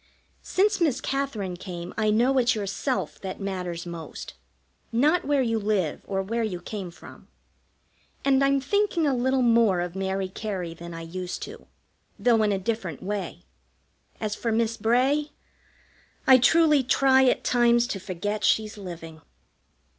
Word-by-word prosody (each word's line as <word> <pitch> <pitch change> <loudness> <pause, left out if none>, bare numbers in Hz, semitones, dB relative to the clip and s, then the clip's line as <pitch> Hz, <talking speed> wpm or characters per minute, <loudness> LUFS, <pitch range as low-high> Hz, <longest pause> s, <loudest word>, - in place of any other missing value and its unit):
Since 395 0 +1
Miss 300 -7 +2
Katherine 255 -10 -2
came 175 -1 -7
I 215 -1 +1
know 245 +5 +3
it's 245 0 +3
yourself 215 +6 -3
that 190 -1 -6
matters 180 -3 -4
most, 170 -2 -8 0.6
not 300 +10 +2
where 285 -2 +2
you 225 -2 0
live 200 -7 -1
or 195 -1 -1
where 230 +4 -2
you 205 -6 -2
came 190 +1 -6
from, 170 - -14 1.0
and 275 0 +4
I'm 275 0 +3
thinking 390 +2 +1
a 280 - +2
little 260 +1 +1
more 230 -6 +4
of 175 0 -3
Mary 190 0 -1
Cary 185 -3 -5
than 170 0 -9
I 165 - -6
used 180 +2 -5
to, - - -10 0.5
though 235 -2 +3
in 210 -1 +2
a 195 - +1
different 190 -6 -3
way. 205 +1 -4 0.8
As 215 -1 -2
for 230 +1 -2
Miss 230 0 +1
Bray, 255 +7 +2 1.0
I 260 -1 +8
truly 305 +2 +5
try 265 +1 +4
at 255 - +2
times 240 -1 +3
to 195 - -3
forget 200 +4 -4
she's 215 -1 +1
living. 165 -4 -9
220 Hz, 155 wpm, -26 LUFS, 185-260 Hz, 1.0 s, I